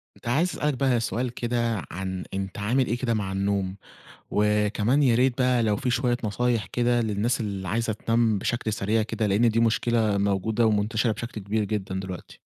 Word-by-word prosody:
كنت - - -12
عايز 155 +9 +2
أسألك 150 -3 -1
بقى 130 -2 +1
سؤال 120 +1 -2
كده 120 -3 -1
عن 95 0 -4
أنت 95 -1 -4
عامل 120 +5 +1
إيه 120 - 0
كده 120 -2 -1
مع 105 -3 -2
النوم؟ 95 -1 -1 0.6
وكمان 105 +5 +2
يا 125 -4 +4
ريت 125 +1 +2
بقى 125 -2 +2
لو 105 -2 +2
في 125 +4 -2
شوية 120 0 +1
نصايح 115 +1 0
كده 120 0 +1
للناس 110 +3 0
اللي 100 -3 -4
عايزة 115 +3 0
تنام 115 0 +1
بشكل 110 +1 -1
سريع 110 +2 +1
كده 110 0 -1
لأن 105 +4 +3
دي 115 +1 +1
مشكلة 115 -2 +2
موجودة 100 +3 +1
ومنتشرة 110 +2 +1
بشكل 115 +1 -6
كبير 105 +2 -1
جدًا 95 -2 -3
دلوقتي. 95 -1 -8
110 Hz, 180 wpm, -25 LUFS, 100-120 Hz, 0.6 s, يا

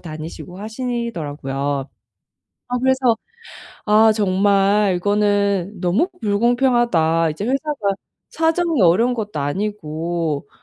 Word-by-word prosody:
다니시고 165 +2 -8
하시더라고요. 220 - -4 1.1
아 250 0 -1
그래서 260 -3 +3 0.7
'아. 215 +1 +5
정말 200 -1 +2
이거는 205 0 0
너무 190 - +2
불공평하다.' 220 -7 +2
이제 160 +7 -5
회사가 265 -5 -1 0.4
사정이 325 -2 +1
어려운 210 +9 +4
것도 210 -8 -4
아니고 160 -3 -3
205 Hz, 245 characters per minute, -20 LUFS, 175-240 Hz, 1.1 s, 아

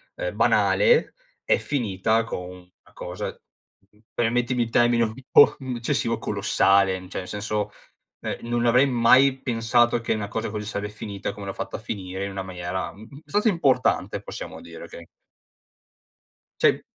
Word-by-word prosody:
ehm, - - -3
banale 485 -1 +3 0.3
è - - +3
finita 110 -4 0
con 90 -5 -6
una 90 0 -18
cosa - - -6 0.6
uhm, 105 - -28
permettimi 120 +1 +1
il 115 - -5
termine 120 0 +3
un 110 -1 -2 0.2
po' - - +7 0.2
eccessivo, 120 0 -1
colossale, 95 0 +2 0.2
cioè, - - -4
nel 90 - -7
senso, 105 0 -3 0.5
ehm, - - -5
non 120 0 0
avrei 125 +4 +5
mai 130 +2 +5
pensato 120 0 +2
che 115 - -1
una 105 -2 -4
cosa 110 +1 -3
così 105 0 -5
sarebbe 105 0 -4
finita 100 -2 -5
come 100 -1 -9
l'ho 95 - -4
fatta - - -5
a - - -5
finire 95 -3 -5
in 100 - -4
una 95 -1 -4
maniera, 90 0 -5
mh, 100 - -15
mh, 140 - -14
abbastanza 205 +7 +1
importante 165 -9 +1
possiamo - - -8
dire, - - -10
okay? 85 - -11 1.6
Sì. - - +4
115 Hz, 160 wpm, -24 LUFS, 100-120 Hz, 1.6 s, po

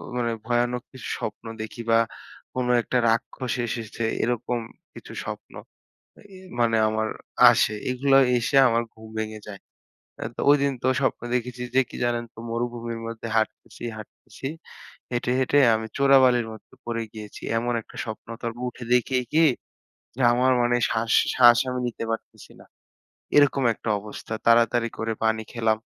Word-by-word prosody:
মানে 120 -1 0 0.2
ভয়ানক 120 0 0
কিছু 130 -3 -9
স্বপ্ন 110 +2 -5 0.2
দেখি 110 +2 -6
বা 115 - +6 0.6
কোনো 125 -1 0
একটা 125 - -1
রাক্ষস 120 +2 -1
এসেছে 115 -1 -4 0.2
এরকম 120 0 -1 0.3
কিছু - - -11
স্বপ্ন - - -7 0.7
এ - - -18
এ - - -12 0.2
মানে 115 -1 +3
আমার 110 0 -1 0.4
আসে। 110 -2 +2 0.2
এগুলাও 135 +1 +4 0.2
এসে 120 +4 -1
আমার 115 0 +2
ঘুম 110 0 -13
ভেঙে 110 0 -4
যায়। 100 -2 -8 0.6
অ্যা - - -4
তো - - -4
ঐদিন 140 -1 +4
তো 130 - +2
স্বপ্নে 130 -2 -1
দেখেছি 125 0 -2
যে 130 - +6
কি - - -8
জানেন 120 -1 0
তো? - - -18
মরুভূমির 115 0 -3
মধ্যে 115 0 -6
হাটতেছি, 110 +2 -2
হাটতেছি। 110 +4 -10 0.7
হেঁটে, 120 0 0
হেঁটে 130 +2 +3 0.2
আমি 110 0 -2
চোরাবালির 130 -4 +5
মধ্যে 110 - -14
পড়ে 115 -1 -2
গিয়েছি। 105 -2 -10 0.2
এমন 120 +1 -1
একটা - - -17
স্বপ্ন 110 -1 -7 0.2
তারপর 120 +1 -4
উঠে 120 0 -10
দেখি 125 +1 +2 0.2
কি, 160 +1 +5 0.7
যে - - -8
আমার 130 +2 +3
মানে 120 0 +2
শ্বাস 115 0 -1 0.2
শ্বাস 120 -1 +7
আমি 125 0 -2
নিতে 115 - -5
পারতেছি 115 - -6
না। - - -14 0.7
এরকম 140 -1 +5
একটা - - -7
অবস্থা। 105 +2 -9
তাড়াতাড়ি 115 0 +4
করে 115 0 -1
পানি 110 0 +1
খেলাম। 110 -2 +1
120 Hz, 155 wpm, -25 LUFS, 115-125 Hz, 0.7 s, শ্বাস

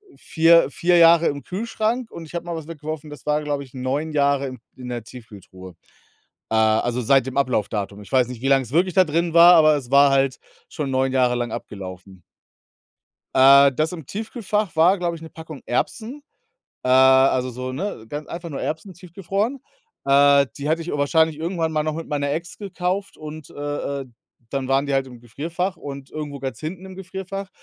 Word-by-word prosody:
4- 165 0 +4
4 175 +3 +2
Jahre 170 0 +6
im 140 -1 -3
Kühlschrank 225 +4 -2
und 165 - -9
ich 155 - -15
habe 170 - -4
mal 170 -1 -4
was 160 -2 -7
weggeworfen, 155 -1 -7
das 150 - -11
war, 150 0 +1
glaube 145 -1 -2
ich, 130 - -17
9 135 +5 -2
Jahre 140 -2 +1
in 130 -1 -8 0.2
in 125 -1 -9
der 120 -2 -4
Tiefkühltruhe, 100 -7 -13 0.7
äh, 110 - -1
also 110 +3 +2
seit 135 +2 +3
dem 130 - -5
Ablaufdatum. 105 -6 -1
Ich 105 - -14
weiß 130 -3 +3
nicht, 125 -2 -8
wie 135 - -1
lange 135 -1 +4
es 120 - -12
wirklich 180 +3 +2
da 185 - +6
drin 165 +1 -1
war, 170 +1 +8
aber 155 -2 +6
es 130 -3 -8
war 140 0 +6
halt 135 -1 +1 0.3
schon 145 -3 -4
9 130 0 +1
Jahre 125 -2 +2
lang 120 -1 -3
abgelaufen. 95 -2 -9 1.1
Äh, 140 +1 +7
das 155 +5 -1
im 160 -6 -8
Tiefkühlfach 215 - -3
war, 175 +5 +4
glaube 170 -1 -2
ich, 160 - -13
'ne 160 - -10
Packung 160 -2 -10
Erbsen, 235 - -3 0.6
äh, - - -1
also 130 0 +5
so 130 +1 -6
ne, 135 - -5
ganz 150 +3 -6
einfach 170 0 -6
nur 140 - -5
Erbsen 180 +5 -5
tiefgefroren. 195 - -3 0.4
Äh, 140 0 +5
die 145 0 -4
hatte 165 +2 0
ich 165 - -6
wahrscheinlich 155 +2 +2
irgendwann 165 -1 -2
mal 155 -1 +1
noch 155 0 -2
mit 165 +1 -6
meiner 145 -2 -1
Ex 170 +4 -5
gekauft 195 0 -3
und, 155 0 -9
äh, 145 -1 -4
äh, - - -12 0.4
dann 135 -2 -3
waren 135 +1 +2
die 140 - -2
halt 135 -1 +1
im 125 -2 -12
Gefrierfach 165 - -4
und 140 -1 -8
irgendwo 150 -2 -6
ganz 135 -1 -6
hinten 170 +4 -6
im 190 0 -10
Gefrierfach. 190 +1 -6
145 Hz, 200 wpm, -22 LUFS, 130-170 Hz, 1.1 s, war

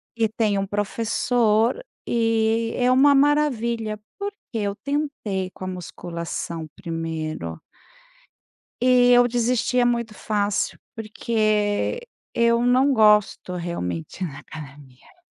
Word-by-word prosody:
E 225 -1 +2
tem 215 -2 0
um 195 - 0
professor, 225 - +1 0.2
e 225 -1 +1
é 250 0 +2
uma 275 +3 +6
maravilha. 235 -7 +1 0.2
Porque 405 +1 -5 0.2
eu 200 -2 -1
tentei 280 -10 -3
com - - -11
a - - -3
musculação 170 -2 -5
primeiro 160 - -4 1.2
e 250 0 +5
eu 245 0 +6
desistia 245 +1 +1
muito 235 -2 0
fácil, 205 -1 -1 0.2
porque 215 - 0 0.3
eu 235 0 +3
não 260 +3 +4
gosto, 210 -5 +3
realmente, 170 - -4
da 145 -5 -7
academia. 140 - -13
220 Hz, 105 wpm, -23 LUFS, 185-245 Hz, 1.2 s, uma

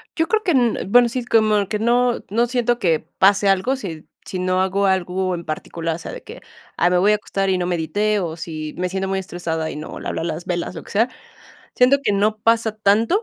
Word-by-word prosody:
Yo 325 0 +1
creo 435 +3 +1
que 365 - +1
en 240 - +1
bueno, 245 0 +6
sí, 245 +1 -3
como 215 -4 +3
que 210 +1 -2
no 240 +2 +2
no 230 +4 +2
siento 240 -1 0
que 165 -8 +1 0.2
pase 200 +1 +4
algo, 195 +8 +2
si 170 - -7 0.2
si 185 - -5
no 185 0 +1
hago 190 +1 +1
algo 185 0 0
en 170 - -7
particular. 165 +1 -4
O - - -6
sea, - - -7
de - - -8
que: - - -11 0.4
"Ay, 175 - +3
me 180 - +3
voy 205 +3 +4
a - - +4
acostar 195 -2 -2
y 185 - +2
no 180 - -1
medité", 205 +5 0
o 165 -4 -3
si 155 -2 -6
me 180 +1 -1
siento 190 +1 -2
muy 195 - 0
estresada 165 -3 -4
y - - -8
no 150 +1 -7
le - - -7
hablé - - -3
a - - -3
las 165 0 -4
velas, 175 0 -3
lo 160 - -7
que - - -13
sea. 225 +5 +2 0.7
Siento 255 +3 +5
que 205 - +1
no 210 +2 +1
pasa 225 -1 +1
tanto, 220 - +2
195 Hz, 245 wpm, -21 LUFS, 175-230 Hz, 0.7 s, bueno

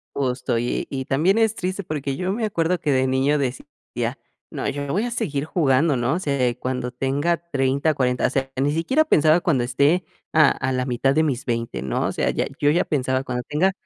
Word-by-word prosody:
Justo, 125 -3 -1
y 120 - -2
y 130 -1 -3
también 175 +12 +2
es 220 -1 +2
triste 185 +1 -3
porque 140 -4 -3
yo 185 +5 -2
me 225 +1 -1
acuerdo 180 -3 0
que 150 - 0
de 130 -1 +2
niño 135 +3 +2
decía: 130 -2 -4 0.3
"No, - - -2
yo 145 0 -4
voy 200 +10 0
a 245 - -3
seguir 145 -10 -2
jugando," 145 -3 +2
¿no? 120 +3 0
O 170 - -1
sea, 140 -7 0
cuando 125 -1 -3
tenga 140 +7 0
30, 140 +2 +1
40,, 125 -2 +1
o - - -2
sea, 135 0 -2
ni 145 +1 +2
siquiera 215 - +2
pensaba 155 - +4
cuando 145 -8 +1
esté 140 +8 +2 0.3
a 155 -3 +5
a 130 0 -2
la 130 -1 -1
mitad 135 +2 +1
de 160 - +4
mis 135 -5 -1
20, 115 - -2
¿no? 65 -2 -1
O - - 0
sea, - - 0
ya - - 0
yo 145 - +3
ya 170 +4 +3
pensaba: 130 -2 0
"Cuando 125 -2 -3
tenga 165 +6 +2
140 Hz, 215 wpm, -22 LUFS, 130-165 Hz, 0.3 s, a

